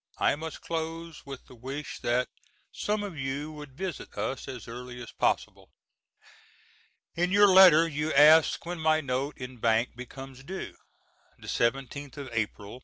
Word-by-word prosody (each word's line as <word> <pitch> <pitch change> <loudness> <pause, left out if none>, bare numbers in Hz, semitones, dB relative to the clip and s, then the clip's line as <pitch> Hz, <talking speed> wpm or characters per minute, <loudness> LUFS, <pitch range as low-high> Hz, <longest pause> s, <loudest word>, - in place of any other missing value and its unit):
I - - +3
must 160 +1 -7
close 165 -1 -5
with 135 -2 -8
the - - -15
wish 135 +5 -6
that 125 +1 +1 0.4
some 210 0 -1
of 195 -5 -6
you 140 +2 -3
would 150 -3 -11
visit 190 -1 -5
us 135 - -3
as 125 -4 -7
early 125 +1 -8
as 120 - -8
possible. - - -1 1.5
In 175 +2 +1
your 205 +1 +7
letter 180 -4 +8
you 150 0 -2
ask 155 +4 +6
when 175 0 -4
my 155 0 +3
note 135 0 -2
in 125 -1 -8
bank 115 +1 +1
becomes 135 +1 -10
due. 190 +6 -6 0.6
The - - -13
seventeenth 135 +4 -1
of 140 -3 -7
Apl. 110 0 -3
140 Hz, 155 wpm, -28 LUFS, 125-160 Hz, 1.5 s, letter